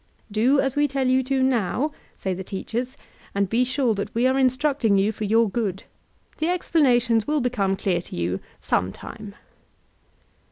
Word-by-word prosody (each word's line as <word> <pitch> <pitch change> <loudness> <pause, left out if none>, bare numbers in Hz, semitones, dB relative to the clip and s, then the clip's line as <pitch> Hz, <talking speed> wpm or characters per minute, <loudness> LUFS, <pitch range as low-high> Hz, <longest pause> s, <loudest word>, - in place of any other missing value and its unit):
"Do 245 +7 +3
as 270 -1 0
we 290 0 +3
tell 270 -1 -1
you 260 +1 +3
to, 265 0 +1
now," 260 +3 +1 0.2
say 190 - -3
the 190 +1 -5
teachers, 235 +7 -4 0.4
''and 200 0 +2
be 230 +6 +2
sure 255 -2 +1
that 200 0 -4
we 235 +2 +2
are 260 +1 +3
instructing 260 -4 +2
you 200 +2 +2
for 215 0 -4
your 225 +2 +3
good. 200 -3 -2 0.6
The 315 - 0
explanations 250 -10 +2
will 300 0 +1
become 225 -7 0
clear 185 -3 0
to - - -10
you 85 +2 -1 0.2
some 90 +1 0
time." 210 -2 -10
235 Hz, 170 wpm, -24 LUFS, 200-265 Hz, 0.6 s, Do